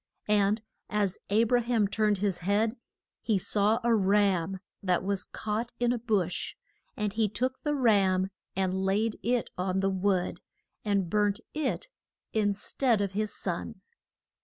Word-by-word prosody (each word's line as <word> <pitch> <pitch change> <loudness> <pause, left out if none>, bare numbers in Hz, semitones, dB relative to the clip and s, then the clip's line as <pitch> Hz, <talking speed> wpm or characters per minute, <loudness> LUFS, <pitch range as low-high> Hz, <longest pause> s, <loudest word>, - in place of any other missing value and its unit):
And 210 +1 +3 0.3
as 205 -3 0
A 215 +3 +4
bra 240 +1 +3
ham 230 -3 +2
turned 210 0 +1
his 190 -2 -1
head 205 +5 +1 0.5
he 215 -3 +1
saw 210 +4 +2
a 235 0 +3
ram 195 -3 +2 0.2
that 185 -2 +1
was 195 -1 -1
caught 220 +3 -3
in 240 0 +2
a 245 - -2
bush, 205 -7 -1 0.4
and 210 -2 -1
he 220 -1 +1
took 255 +6 -2
the 295 -1 0
ram 195 -7 +3 0.2
and 190 0 0
laid 210 +3 +1
it 245 0 0
on 185 +1 0
the 195 0 +1
wood, 190 -1 0 0.4
and 200 -3 +1
burnt 205 +1 +1
it 305 - -1 0.5
in 210 -2 +2
stead 235 +2 +1
of 200 -2 0
his 210 +2 -1
son. - - -4
205 Hz, 155 wpm, -29 LUFS, 195-225 Hz, 0.5 s, A